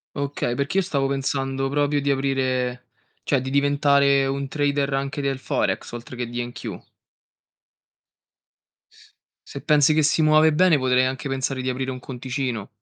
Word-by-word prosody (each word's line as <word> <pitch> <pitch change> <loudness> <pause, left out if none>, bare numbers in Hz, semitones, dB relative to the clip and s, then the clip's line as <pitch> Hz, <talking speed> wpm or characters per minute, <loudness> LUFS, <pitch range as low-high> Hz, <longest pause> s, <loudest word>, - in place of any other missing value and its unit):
Okay, 140 -4 -2
perché 140 +8 -2
io 195 - +3
stavo 140 -6 -1
pensando 135 0 -2
proprio 145 0 +1
di 140 0 0
aprire 130 -2 -1 0.3
cioè 135 -3 +1
di 130 - -4
diventare 140 -1 +3
un 140 0 -2
trader 145 -1 0
anche 140 +1 -2
del 135 -1 -2
Forex, - - -2
oltre 120 +1 -8
che 120 -1 -4
di 120 0 -3
NQ. 120 - -8 2.6
Se - - -7
pensi 150 0 +4
che 155 0 +2
si 155 +2 +2
muove 155 0 +5
bene, 170 -1 +4
potrei 130 -1 +2
anche 130 +2 -3
pensare 135 0 -2
di 130 - -2
aprire 130 +1 -2
un 130 - -6
conticino. 125 -4 -4
135 Hz, 155 wpm, -23 LUFS, 130-145 Hz, 2.6 s, muove